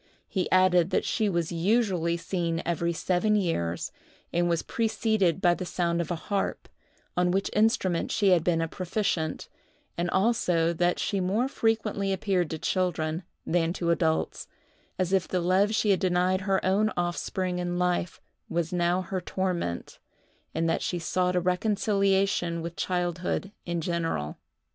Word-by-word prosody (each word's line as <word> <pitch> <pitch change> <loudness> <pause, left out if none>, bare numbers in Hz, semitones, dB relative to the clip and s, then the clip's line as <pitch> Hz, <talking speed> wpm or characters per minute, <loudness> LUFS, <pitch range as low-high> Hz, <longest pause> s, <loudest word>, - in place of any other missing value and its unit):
He 185 -3 -1
added 185 -2 +4
that - - +1
she 215 -2 +1
was 170 -3 -1
usually 175 -2 +1
seen 170 -2 -2
every 170 0 0
seven 185 +5 +1
years, 90 - -1 0.4
and 175 0 +2
was 170 -1 +1
preceded 220 -5 +1
by 175 -1 +5
the 185 - -4
sound 170 -1 0
of 165 - -5
a 175 - 0
harp, 195 +5 -2 0.5
on 180 0 +2
which 195 +2 0
instrument 205 -5 +2
she 200 -2 +3
had 175 -3 +4
been 165 -2 +2
a 165 - 0
proficient; 180 -3 -2 0.5
and 175 0 0
also 180 -5 +2
that 175 +1 +1
she 200 - -1
more 200 +7 +1
frequently 220 -5 0
appeared 185 -3 0
to 160 - -3
children 170 -2 -1 0.2
than 170 0 +1
to 170 -2 0
adults,—as 170 +2 -2
if 190 -2 +2
the 185 - 0
love 190 +5 +2
she 215 -2 +2
had 190 - +3
denied 185 0 +2
her 190 0 +1
own 200 +3 +3
offspring 180 +1 -1
in 175 0 -2
life 180 -1 0 0.3
was 170 0 -1
now 175 +1 +1
her 185 +1 -3
torment, 175 - -3 0.6
and 165 +1 +1
that 165 - +1
she 175 - -1
sought 180 +2 0
a - - +4
reconciliation 195 -2 +1
with 170 0 -5
childhood 180 +3 -2 0.2
in 170 -1 -1
general. 165 - -2
180 Hz, 155 wpm, -27 LUFS, 170-195 Hz, 0.6 s, by